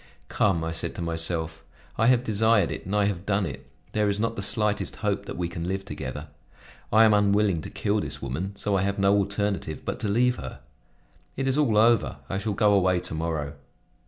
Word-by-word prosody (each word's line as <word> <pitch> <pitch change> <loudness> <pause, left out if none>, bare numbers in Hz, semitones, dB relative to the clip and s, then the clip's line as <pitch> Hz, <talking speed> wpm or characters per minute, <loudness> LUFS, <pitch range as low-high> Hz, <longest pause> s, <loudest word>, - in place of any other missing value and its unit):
"Come," 95 -6 +1
I 80 - -2
said 80 - -4
to - - -5
myself, 80 -1 -2 0.3
"I 115 - +2
have 125 -1 +4
desired 110 -3 +2
it, - - -6
and 100 - -1
I 105 -1 +3
have 100 -3 -2
done 100 -1 +1
it; - - -7 0.2
there 105 -1 +1
is 100 0 -1
not 115 +1 0
the 100 - -4
slightest 105 0 0
hope - - -1
that - - -6
we 90 -1 -1
can 85 0 -5
live 95 +1 -3
together; 75 -3 -6 0.6
I 110 +1 +7
am 110 -1 +6
unwilling 100 -4 +3
to - - -7
kill 105 +1 0
this - - -4
woman, 90 +10 -4
so 100 -1 0
I 95 - +2
have 100 +1 -1
no 100 0 +4
alternative 100 -5 -1
but - - -3
to - - -2
leave 120 +4 +2
her. 65 0 -8 0.8
It 135 0 -1
is 135 - +2
all 140 -8 +2
over; 115 +1 +3
I 95 - -1
shall 105 +1 -2
go 105 +1 +3
away 95 -2 +3
to 90 - -5
morrow." 80 -3 -2
100 Hz, 215 wpm, -26 LUFS, 85-105 Hz, 0.8 s, I